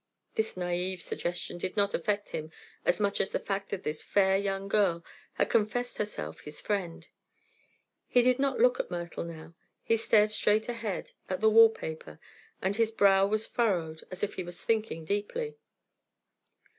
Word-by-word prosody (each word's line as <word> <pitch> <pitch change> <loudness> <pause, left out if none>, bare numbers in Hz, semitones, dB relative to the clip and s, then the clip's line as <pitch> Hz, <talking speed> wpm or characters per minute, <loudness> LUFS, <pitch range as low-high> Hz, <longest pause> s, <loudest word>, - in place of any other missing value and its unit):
This 220 -3 -1
naive 180 +1 -1
suggestion 175 +1 -4
did 185 +3 -4
not 200 0 +2
affect 205 +3 -1
him 155 0 -5 0.4
as 175 - +2
much 200 -1 +1
as - - -1
the - - 0
fact 195 0 -3
that 195 -1 -4
this 150 0 -3
fair 190 -1 +3
young 195 0 -1
girl 190 -5 +2 0.3
had - - 0
confessed 230 +3 0
herself 145 - -4
his 150 0 -8
friend. 190 -5 -3 1.0
He 245 - +4
did 255 +1 +3
not 275 -1 +1
look 250 +2 +4
at - - -2
Myrtle 170 -1 -4
now; 165 0 -9 0.3
he 230 - +2
stared 215 -1 +4
straight 215 0 +2
ahead, 230 -5 -4 0.2
at 185 - -1
the 220 0 +4
wall 225 +1 +9
paper, 160 - -7 0.4
and 190 +2 +1
his 230 -1 +3
brow 195 -3 +4
was 215 +1 0
furrowed 170 -9 -1
as 185 +1 -7
if 205 - 0
he 185 - -4
was 175 0 -8
thinking 215 -8 0
deeply. 445 - -2
200 Hz, 170 wpm, -30 LUFS, 175-220 Hz, 1.0 s, wall